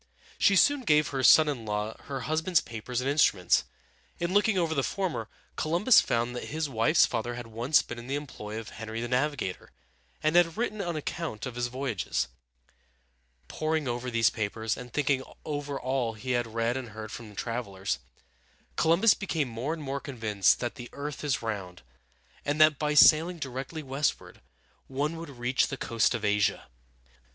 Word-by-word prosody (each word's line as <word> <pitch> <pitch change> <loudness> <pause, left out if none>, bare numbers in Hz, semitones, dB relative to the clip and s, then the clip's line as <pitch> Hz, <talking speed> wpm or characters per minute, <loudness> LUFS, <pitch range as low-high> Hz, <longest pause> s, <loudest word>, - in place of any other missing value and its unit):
She 200 - +5
soon 285 +8 +4
gave 150 - +3
her 135 -1 -2
son 155 +4 +7
in 135 -6 -2
law 105 +1 -3
her 135 -2 -4
husband's 160 +4 +1
papers 120 +2 -4
and 130 - -3
instruments. 140 - +3 0.5
In 170 +1 -2
looking 205 0 +3
over 165 -3 +1
the 140 - +1
former, 160 - -2 0.3
Columbus 175 +10 +4
found 120 +1 -1
that - - -5
his 155 0 -2
wife's 135 +5 +4
father 120 0 -3
had 120 -1 -6
once 120 +7 +2
been 120 - -7
in 120 - -10
the 135 - -1
employ 110 -7 -6
of 115 - -8
Henry 110 0 -6
the 120 - -3
Navigator, 130 -5 -1 0.5
and 155 +2 +2
had 175 0 +4
written 215 -3 -2
an 175 -3 -3
account 155 -6 -4
of 130 - -5
his 120 0 -1
voyages. 115 - -2 1.2
Poring 155 -2 -1
over 120 +1 -2
these 115 -1 +3
papers, 110 +1 -2
and 125 -1 -9
thinking 140 -1 +1 0.2
over 145 -2 -3
all 130 -3 -1
he 110 +4 -5
had 120 -1 +1
read 115 +1 0
and 130 -3 -5
heard 110 0 -8
from 110 -4 -9
travelers, 100 - -3 0.8
Columbus 170 +7 +5
became 160 -9 -2
more 115 +6 -3
and 160 -2 -4
more 140 0 -3
convinced 110 -8 +1
that 120 - -2
the 120 - -9
earth 145 +1 -6
is 135 -6 -1
round, 95 - -5 0.6
and 145 +1 -1
that 155 -2 +6
by 150 -1 0
sailing 165 +4 +6
directly 135 +2 -5
westward 135 +2 -2 0.5
one 145 +5 -2
would 165 -1 -7
reach 125 -1 0
the 135 - -5
coast 115 +1 +1
of 110 -2 -3
Asia. 105 0 +1
130 Hz, 175 wpm, -28 LUFS, 115-155 Hz, 1.2 s, son